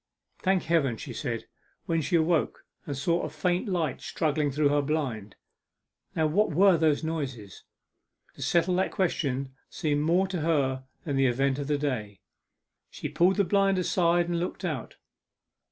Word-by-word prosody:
'Thank 190 Hz, -1 st, +1 dB
Heaven!' 145 Hz, -8 st, +1 dB
she -, -, -7 dB
said, -, -, -4 dB, 0.4 s
when 165 Hz, -1 st, 0 dB
she 175 Hz, +4 st, 0 dB
awoke 165 Hz, 0 st, +1 dB, 0.2 s
and 140 Hz, -2 st, -3 dB
saw 170 Hz, +5 st, +1 dB
a -, -, -3 dB
faint 175 Hz, -, -1 dB
light 165 Hz, -7 st, -1 dB
struggling 150 Hz, -2 st, 0 dB
through 145 Hz, +1 st, +2 dB
her 145 Hz, 0 st, +2 dB
blind. 130 Hz, -9 st, -3 dB, 0.8 s
'Now 160 Hz, -, +2 dB
what 195 Hz, +8 st, +2 dB
were 190 Hz, +4 st, +5 dB
those 155 Hz, -2 st, +2 dB
noises?' 135 Hz, -, -5 dB, 0.7 s
To -, -, -13 dB
settle 175 Hz, +1 st, +2 dB
that 190 Hz, -, +1 dB
question 140 Hz, -8 st, -1 dB, 0.2 s
seemed 150 Hz, -4 st, -1 dB
more 175 Hz, +5 st, +2 dB
to 180 Hz, -4 st, -2 dB
her 135 Hz, -5 st, 0 dB, 0.2 s
than 145 Hz, -4 st, -2 dB
the 135 Hz, 0 st, +4 dB
event 135 Hz, +2 st, +1 dB
of 140 Hz, -, -3 dB
the 150 Hz, -1 st, +1 dB
day. 110 Hz, -9 st, -3 dB, 0.7 s
She -, -, -6 dB
pulled 180 Hz, +3 st, +3 dB
the 200 Hz, -, +3 dB
blind 195 Hz, +1 st, +2 dB
aside 175 Hz, -1 st, +2 dB
and 170 Hz, -1 st, -1 dB
looked 180 Hz, +2 st, -4 dB
out. 150 Hz, -9 st, -4 dB
155 Hz, 165 wpm, -27 LUFS, 140-175 Hz, 0.8 s, were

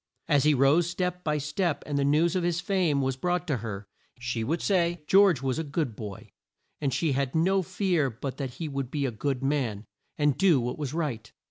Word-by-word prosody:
As 145 Hz, -2 st, +3 dB
he 150 Hz, -1 st, +5 dB
rose 145 Hz, +6 st, +4 dB
step 180 Hz, 0 st, -2 dB
by 150 Hz, -2 st, 0 dB
step, 150 Hz, +3 st, -1 dB
and 145 Hz, -, -3 dB
the 140 Hz, -, +2 dB
news 155 Hz, +5 st, +3 dB
of 185 Hz, -, +1 dB
his 175 Hz, 0 st, 0 dB
fame 175 Hz, -7 st, +1 dB
was 130 Hz, 0 st, 0 dB
brought 180 Hz, +6 st, -1 dB
to 145 Hz, -6 st, 0 dB
her, 105 Hz, -3 st, -6 dB, 0.3 s
she 120 Hz, -1 st, -3 dB
would 160 Hz, +9 st, -1 dB
say 175 Hz, -4 st, +1 dB
"George 190 Hz, -6 st, +5 dB
was 130 Hz, +2 st, 0 dB
a -, -, -1 dB
good 145 Hz, -5 st, -2 dB
boy," 105 Hz, -4 st, -8 dB, 0.5 s
and 140 Hz, -3 st, 0 dB
she 160 Hz, +3 st, 0 dB
had 135 Hz, +1 st, -1 dB
no 190 Hz, +4 st, +3 dB
fear 180 Hz, -5 st, 0 dB
but 130 Hz, +3 st, -6 dB
that 130 Hz, -3 st, -5 dB
he 165 Hz, -, -4 dB
would 135 Hz, -3 st, -3 dB
be 140 Hz, 0 st, -1 dB
a 130 Hz, -, -1 dB
good 135 Hz, +4 st, -2 dB
man, 125 Hz, -7 st, -1 dB, 0.3 s
and 145 Hz, -2 st, +1 dB
do 175 Hz, -8 st, +5 dB
what 120 Hz, +5 st, -3 dB
was 145 Hz, 0 st, -3 dB
right. 130 Hz, -10 st, -3 dB
145 Hz, 220 wpm, -27 LUFS, 130-170 Hz, 0.5 s, he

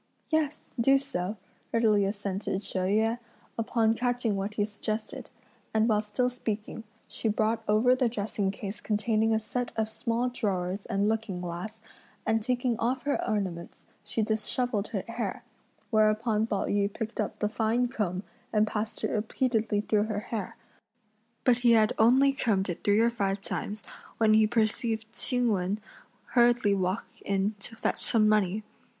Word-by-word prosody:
"Yes! 310 Hz, -2 st, 0 dB, 0.2 s
do 270 Hz, +4 st, +5 dB
so!" 215 Hz, -7 st, -3 dB, 0.3 s
readily 215 Hz, -3 st, +3 dB
assented 200 Hz, 0 st, -2 dB
She 190 Hz, -, -3 dB
Yüeh, 220 Hz, +5 st, +1 dB, 0.4 s
upon 225 Hz, -1 st, +2 dB
catching 245 Hz, -2 st, 0 dB
what 200 Hz, +2 st, -3 dB
he 205 Hz, -, +2 dB
suggested; 215 Hz, +1 st, -5 dB, 0.5 s
and 220 Hz, +1 st, +4 dB
while 210 Hz, -2 st, +3 dB
still 250 Hz, +4 st, 0 dB
speaking, 220 Hz, -2 st, -4 dB, 0.2 s
she -, -, -2 dB
brought 220 Hz, +2 st, +1 dB
over 220 Hz, +4 st, +4 dB
the 255 Hz, -2 st, +2 dB
dressing 205 Hz, -3 st, -1 dB
case 200 Hz, +1 st, -6 dB
containing 220 Hz, +1 st, +1 dB
a 220 Hz, -, +3 dB
set 240 Hz, +3 st, -3 dB
of 220 Hz, -1 st, 0 dB
small 230 Hz, +2 st, -1 dB
drawers 195 Hz, -5 st, -2 dB
and 200 Hz, +1 st, +1 dB
looking 220 Hz, -4 st, -1 dB
glass, 180 Hz, +5 st, -5 dB, 0.5 s
and 225 Hz, 0 st, +2 dB
taking 245 Hz, 0 st, 0 dB
off 250 Hz, +3 st, 0 dB
her 285 Hz, 0 st, 0 dB
ornaments, 185 Hz, -5 st, -3 dB, 0.2 s
she 225 Hz, -, -1 dB
dishevelled 220 Hz, 0 st, -1 dB
her 195 Hz, -4 st, -3 dB
hair; 230 Hz, 0 st, -4 dB, 0.5 s
whereupon 215 Hz, 0 st, +3 dB
Pao 200 Hz, -3 st, -1 dB
yü 200 Hz, 0 st, +1 dB
picked 225 Hz, +2 st, -5 dB
up 210 Hz, -, -3 dB
the 210 Hz, -, 0 dB
fine 225 Hz, +3 st, +1 dB
comb 200 Hz, -6 st, -2 dB, 0.3 s
and 215 Hz, 0 st, +3 dB
passed 215 Hz, +1 st, -4 dB
it -, -, 0 dB
repeatedly 220 Hz, -1 st, 0 dB
through 210 Hz, 0 st, +1 dB
her 210 Hz, -2 st, -2 dB
hair; 215 Hz, -5 st, -3 dB, 0.9 s
but 250 Hz, -2 st, +4 dB
he 240 Hz, -1 st, +5 dB
had 215 Hz, -1 st, +4 dB
only 260 Hz, +5 st, +5 dB
combed 200 Hz, -8 st, 0 dB
it 175 Hz, -, -4 dB
three 205 Hz, +2 st, +4 dB
or 235 Hz, +1 st, +4 dB
five 200 Hz, -3 st, -1 dB
times, 210 Hz, 0 st, -4 dB, 0.3 s
when 220 Hz, -1 st, +4 dB
he 215 Hz, 0 st, +5 dB
perceived 220 Hz, 0 st, 0 dB
Ch'ing 245 Hz, -2 st, +2 dB
Wen 195 Hz, +1 st, 0 dB, 0.5 s
hurriedly 240 Hz, -4 st, +4 dB
walk 190 Hz, +2 st, 0 dB, 0.2 s
in 200 Hz, +1 st, 0 dB
to 225 Hz, +3 st, -7 dB
fetch 225 Hz, -, -1 dB
some 215 Hz, -2 st, +5 dB
money. 210 Hz, -1 st, +2 dB
220 Hz, 160 wpm, -28 LUFS, 205-230 Hz, 0.9 s, do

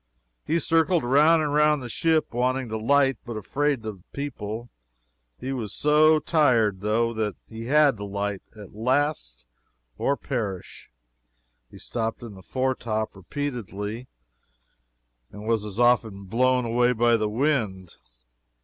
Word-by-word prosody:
He 160 Hz, -, 0 dB
circled 165 Hz, +1 st, +2 dB
round 150 Hz, +6 st, +4 dB
and 145 Hz, -1 st, -1 dB
round 150 Hz, -2 st, +3 dB
the -, -, -5 dB
ship, 160 Hz, +4 st, +1 dB
wanting 125 Hz, +1 st, 0 dB
to 110 Hz, -, -3 dB
light, 135 Hz, +2 st, +2 dB
but 120 Hz, -3 st, -6 dB
afraid 135 Hz, +3 st, -1 dB
of 105 Hz, -3 st, -6 dB
the -, -, -24 dB
people. 120 Hz, -5 st, -5 dB, 0.7 s
He 135 Hz, +1 st, -4 dB
was 115 Hz, -6 st, -5 dB
so 155 Hz, +1 st, +5 dB
tired, 120 Hz, -, +2 dB
though, 115 Hz, +3 st, +1 dB
that 110 Hz, -2 st, -2 dB
he 115 Hz, 0 st, -8 dB
had 145 Hz, -1 st, +4 dB
to 100 Hz, -, -6 dB
light, 100 Hz, 0 st, -3 dB
at 105 Hz, -3 st, -12 dB
last, 115 Hz, -, -1 dB, 0.5 s
or 140 Hz, -, +1 dB
perish. 105 Hz, -9 st, -5 dB, 0.8 s
He -, -, -14 dB
stopped 115 Hz, 0 st, -4 dB
in 115 Hz, -3 st, -8 dB
the 95 Hz, -, -13 dB
foretop, 120 Hz, -3 st, -2 dB
repeatedly, 115 Hz, -1 st, -5 dB, 1.2 s
and 105 Hz, +1 st, -10 dB
was 115 Hz, -2 st, +1 dB
as 105 Hz, -1 st, -7 dB
often 115 Hz, -5 st, +2 dB
blown 125 Hz, +5 st, +1 dB
away 120 Hz, +2 st, +2 dB
by 120 Hz, 0 st, +3 dB
the 110 Hz, -2 st, 0 dB
wind. 110 Hz, -, -1 dB
120 Hz, 140 wpm, -25 LUFS, 105-140 Hz, 1.2 s, so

